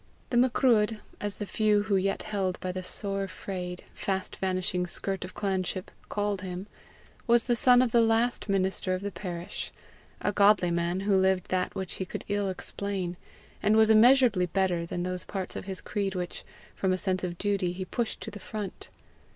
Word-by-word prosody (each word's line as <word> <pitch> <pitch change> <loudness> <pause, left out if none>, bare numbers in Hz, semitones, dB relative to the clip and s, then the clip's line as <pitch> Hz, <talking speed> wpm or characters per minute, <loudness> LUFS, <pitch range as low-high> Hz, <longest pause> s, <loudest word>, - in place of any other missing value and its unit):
The 240 - +2
Macruadh, 235 -3 +4 0.2
as 205 -1 -2
the 205 - -4
few 210 0 +2
who 205 -2 +1
yet 195 +1 0
held 195 -4 -2
by 185 - -3
the 185 0 -4
sore 195 +1 -1
frayed, 180 -1 -6
fast 190 -1 -2
vanishing 185 -1 0
skirt 195 +2 -2
of 180 - -8
clanship, 190 -2 -2 0.2
called 205 -2 -1
him, 185 0 -5 0.6
was 235 -1 +5
the 240 - +1
son 250 +2 +6
of 245 - 0
the 235 - +5
last 225 0 +2
minister 190 -1 +1
of 185 - -6
the 205 - -2
parish 175 -3 -5 0.5
a 205 - 0
godly 200 -3 +4
man, 170 +2 0
who 200 0 +2
lived 190 -1 +2
that 185 -1 0
which 190 -2 -4
he - - 0
could - - -6
ill 205 -1 0
explain, 190 -1 -3 0.5
and 210 +1 +4
was 220 0 +6
immeasurably 225 -4 +6
better 175 -2 0
than 175 +1 -3
those 180 0 -3
parts 190 -2 -5
of - - -5
his 190 -1 -3
creed 200 -2 -2
which, 180 -1 -4 0.3
from 190 - 0
a 185 - +2
sense 185 -1 -1
of 175 -1 -3
duty, 200 -3 0
he 185 +1 -5
pushed 235 +3 -3
to 220 - -6
the 205 - -8
front. 205 0 -6
195 Hz, 190 wpm, -28 LUFS, 185-210 Hz, 0.6 s, son